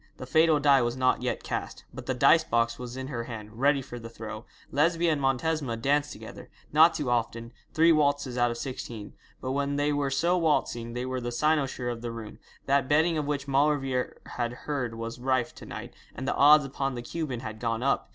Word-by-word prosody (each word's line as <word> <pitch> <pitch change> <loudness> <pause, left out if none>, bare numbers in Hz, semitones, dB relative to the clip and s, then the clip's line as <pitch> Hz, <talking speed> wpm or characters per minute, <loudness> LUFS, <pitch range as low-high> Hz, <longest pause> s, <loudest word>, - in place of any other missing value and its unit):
The - - -7
fatal 160 +3 +4
die 140 -2 +5
was 120 +1 -1
not 130 -1 +2
yet 125 - -2
cast, - - -5
but - - -9
the 130 - 0
dice 145 +5 +5
box 115 -5 0
was 125 0 -7
in 130 - -4
her 120 -4 -4
hand 110 -1 -8
ready 140 0 +3
for 120 -1 -8
the 115 0 -9
throw. 110 0 -8 0.3
Lesbia 165 +4 +2
and 150 -2 -1
Montesma 135 -1 0
danced 145 +5 +1
together - - -10 0.2
not 160 +2 +6
too 130 -4 -1
often, 115 0 -2 0.2
three 165 +1 +6
waltzes 145 -4 +2
out 120 -1 +2
of 120 - -4
sixteen 120 -5 -6 0.3
but 130 - -3
when 140 +1 -1
they 145 +1 +1
were 145 -1 0
so 170 +7 +2
waltzing 120 -7 0
they 125 +1 -3
were 130 0 -3
the 120 0 -3
cynosure 135 -2 0
of 115 -1 -6
the 120 - -4
room. 115 -2 -8 0.3
That 140 -1 +2
betting 160 +3 +3
of 150 -2 -2
which 140 -1 -2
Maulevrier 135 -2 +1
had 120 -1 -3
heard 130 -6 -2
was 115 +1 -6
rife 130 -1 0
to - - -12
night, - - -7 0.2
and 130 - -5
the - - +1
odds 150 +1 +6
upon 135 -1 -3
the 120 - -5
Cuban 135 -3 -4
had 110 -3 -7
gone 115 0 -1
up. 135 - 0
130 Hz, 215 wpm, -28 LUFS, 120-145 Hz, 0.3 s, not